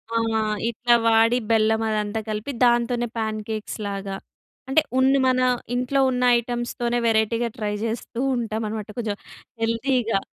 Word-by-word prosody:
ఆ! - - +3 0.5
ఇట్లా 240 +1 +2
వాడి 225 +2 +4
బెల్లం 220 0 +3
అదంతా 210 0 -1
కలిపి, 215 +5 -3
దాంతోనే 240 0 +2
పాన్ 220 -1 -2
కేక్స్‌ 215 -1 -4
లాగా 195 0 -4 0.5
అంటే, 275 +4 +4 0.2
ఉన్ని 270 +1 +4
మన 255 0 +3 0.4
ఇంట్లో 250 +3 0
ఉన్న 250 -1 0
ఐటెమ్స్‌ 240 0 -3
తోనే 240 0 0
వేరైటీ‌గా 230 +1 +2
ట్రై 210 -2 -2
జేస్తూంటామన్నమాట. 225 -2 -2
కొంచెం 220 -4 -2 0.5
హెల్తీగా 230 -1 +1
230 Hz, 130 wpm, -23 LUFS, 220-245 Hz, 0.5 s, వాడి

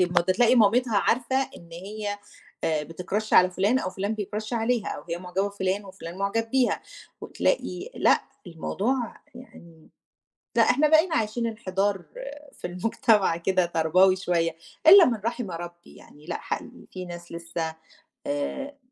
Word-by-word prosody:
ده 175 -1 +3
تلاقي 240 +5 +4
مامتها 235 0 +4
عارفة 245 +5 +1 0.2
إن 170 - -15
هي 205 +4 -5 0.5
آآ 155 -2 0
بتCrush 185 +7 -4
على 180 0 +7
فُلان، 200 +8 +2
أو 185 - -3
فُلان 200 +4 -3
بيCrush 215 +2 -5
عليها، 230 -1 0
أو - - -5
هي 170 0 -3
معجبة 185 +2 -2
بفُلان، 200 0 -2
وفُلان 185 -2 -9
مُعجب 225 +3 -1
بيها، 260 -1 +2 0.4
وتلاقي 375 -3 -2
لأ، - - +4 0.3
الموضوع 220 +8 -2 0.2
يعني 170 -10 -15 0.7
لأ، - - +6
إحنا 285 +5 +4
بقينا 320 +2 +4
عايشين 230 -1 0
انحدار 200 -4 -1 0.5
في - - -6
المجتمع 195 -1 +2
كده 185 +1 +1
تربوي 175 +3 +3
شوية، 170 -3 0 0.3
إلا 370 +1 +10
من 235 -3 +1
رحِم 235 -4 -2
ربي 175 0 -9
يعني، 150 +1 -17
لأ، 170 - -3
حقيقي - - -6
في 185 -1 -6
ناس 175 -1 -9
لسه 165 -1 -4 0.5
آآ 285 0 -3
200 Hz, 145 wpm, -26 LUFS, 175-235 Hz, 0.7 s, إلا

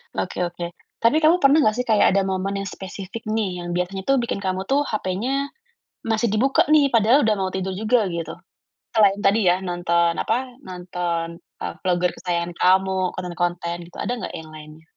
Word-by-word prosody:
Oke - - -2
oke. 175 0 -5 0.2
Tapi 230 +7 +3
kamu 335 +3 +5
pernah 290 +1 +5
nggak 215 0 +3
sih 250 - -8
kayak 215 -2 +4
ada 195 +1 +3
momen 190 +1 -2
yang 195 - -4
spesifik 195 +3 -8
nih, 190 -5 -2
yang 175 - -5
biasanya 180 +2 -2
tuh 275 +3 +2
bikin 235 -4 -3
kamu 190 0 -2
tuh 285 +2 +2
HP-nya 240 +5 -2 0.6
masih 225 +1 +1
dibuka 230 +8 +2
nih, 300 -3 +4
padahal 230 +5 +4
udah 215 -1 +3
mau 190 - 0
tidur 190 0 -2
juga, 220 +4 +2
gitu? 165 -2 -4 0.6
Selain 205 -3 +4
tadi 205 +1 +3
ya, 180 +2 +3
nonton 170 -1 +1
apa, 225 - +1 0.3
nonton, 175 -2 -4 0.2
eee, - - -3
vlogger 180 -1 +2
kesayangan 175 -1 -2
kamu, 190 +1 +3 0.2
konten-konten 175 -1 -2
gitu, 175 - -14
ada - - -2
nggak - - -6
yang 160 -1 -8
lainnya? 155 +1 -12
190 Hz, 180 wpm, -22 LUFS, 175-225 Hz, 0.6 s, kamu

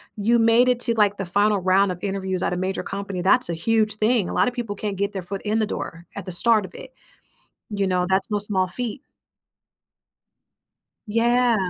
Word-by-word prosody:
You 230 +3 +2
made 230 +2 +4
it 250 -1 +1
to 235 - 0
like 205 -2 +2
the 195 - -4
final 205 +3 +2
round 190 +1 +2
of 180 - -6
interviews 190 -2 -3
at - - -1
a 180 - -2
major 185 +1 -2
company, 195 -2 -5
that's 200 +6 +3
a - - -1
huge 215 +5 +1
thing. 215 -2 +1
A - - -5
lotta 250 - +2
people 235 -4 -5
can't 205 0 -4
get 200 +1 -1
their 195 -2 -5
foot 195 +2 -6
in 215 +1 0
the 215 - +2
door 170 -4 -6
at 200 - -6
the 185 - -6
start 215 +3 +2
of - - -13
it, - - -11 0.8
you 200 -2 -1
know, 180 -1 +1
that's 190 +1 +2
no 210 -1 0
small 195 -3 +1
feat. 245 +6 -5 2.1
Yeah. 235 +2 +2
205 Hz, 205 wpm, -23 LUFS, 190-225 Hz, 2.1 s, made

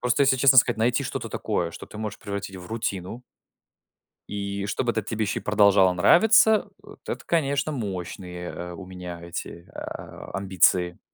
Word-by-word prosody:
Просто, 125 +3 +2
если 135 -1 +4
честно 135 +1 +5
сказать, 120 -2 +5
найти 120 +2 +2
что-то - - -4
такое, 85 -1 -2
что - - -9
ты 105 - -11
можешь 105 -1 -5
превратить 100 -1 -6
в 90 -1 -10
рутину. 110 0 -4 1.1
И 100 -1 -4
чтобы 120 +4 0
этот 110 -2 -3
тебе 110 -1 -1
еще 100 - -2
и - - -16
продолжало 100 -3 +5
нравиться, 220 - +5
вот - - -14
это, - - -4
конечно, 140 -3 0
мощные, 90 - -5
э, 90 0 -6
у 95 +2 -9
меня 90 -2 -8
эти, 85 0 -7
а, - - -8
амбиции. 90 -2 +2
100 Hz, 165 wpm, -25 LUFS, 90-120 Hz, 1.1 s, честно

